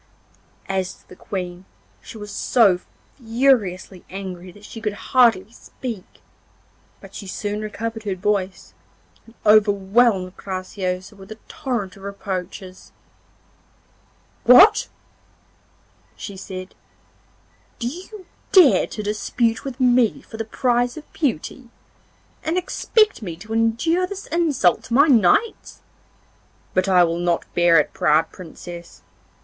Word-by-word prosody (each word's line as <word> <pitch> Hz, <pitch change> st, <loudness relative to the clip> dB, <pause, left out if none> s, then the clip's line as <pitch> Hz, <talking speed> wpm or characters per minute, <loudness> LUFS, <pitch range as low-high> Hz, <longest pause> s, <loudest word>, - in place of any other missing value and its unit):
As 190 Hz, -1 st, -2 dB
to -, -, -27 dB
the -, -, -12 dB
Queen, 180 Hz, -1 st, -6 dB, 0.4 s
she -, -, -11 dB
was 210 Hz, -1 st, -8 dB
so 200 Hz, -4 st, +3 dB, 0.4 s
furiously 225 Hz, -7 st, 0 dB
angry 185 Hz, -1 st, -7 dB
that 205 Hz, +3 st, -16 dB
she 225 Hz, -, -9 dB
could 210 Hz, -2 st, -2 dB, 0.2 s
hardly 225 Hz, -6 st, +4 dB
speak; 230 Hz, -4 st, -9 dB, 0.8 s
but -, -, -14 dB
she 200 Hz, -, -8 dB
soon 205 Hz, +2 st, -4 dB
recovered 225 Hz, +1 st, -5 dB
her 200 Hz, -3 st, -3 dB
voice, 195 Hz, 0 st, -2 dB, 0.5 s
and 230 Hz, -, -18 dB
overwhelmed 205 Hz, -1 st, +3 dB
Graciosa 185 Hz, 0 st, -5 dB
with 195 Hz, +1 st, -14 dB
a 220 Hz, -, -8 dB
torrent 240 Hz, -10 st, -4 dB
of -, -, -15 dB
reproaches. 190 Hz, -2 st, -6 dB, 1.5 s
'What!' 390 Hz, -, +7 dB, 1.3 s
she 200 Hz, -, -8 dB
said, 185 Hz, -1 st, -8 dB, 1.0 s
'do 235 Hz, -, -3 dB
you 370 Hz, -, -8 dB, 0.3 s
dare 355 Hz, -9 st, +6 dB
to 215 Hz, -, -6 dB
dispute 225 Hz, +3 st, -1 dB
with 270 Hz, -1 st, -7 dB
me 245 Hz, -3 st, +3 dB
for 220 Hz, -, -11 dB
the 225 Hz, -, -3 dB
prize 245 Hz, +2 st, 0 dB
of 310 Hz, -, -12 dB
beauty, 260 Hz, -, -3 dB, 0.7 s
and 325 Hz, +3 st, -1 dB
expect 420 Hz, -, +1 dB
me 175 Hz, -6 st, -5 dB
to 215 Hz, +7 st, -9 dB
endure 230 Hz, +11 st, +1 dB
this 400 Hz, +1 st, -7 dB
insult 300 Hz, -, +2 dB
to 230 Hz, -, -2 dB
my 285 Hz, +3 st, +7 dB
knights? 265 Hz, -, +2 dB, 0.9 s
But 185 Hz, +1 st, +1 dB
I 180 Hz, -2 st, +6 dB
will 170 Hz, 0 st, 0 dB
not 175 Hz, -1 st, 0 dB
bear 170 Hz, -2 st, +5 dB
it, 150 Hz, -, -1 dB
proud 155 Hz, +2 st, +2 dB
Princess. 175 Hz, 0 st, -11 dB
210 Hz, 125 wpm, -21 LUFS, 185-245 Hz, 1.5 s, What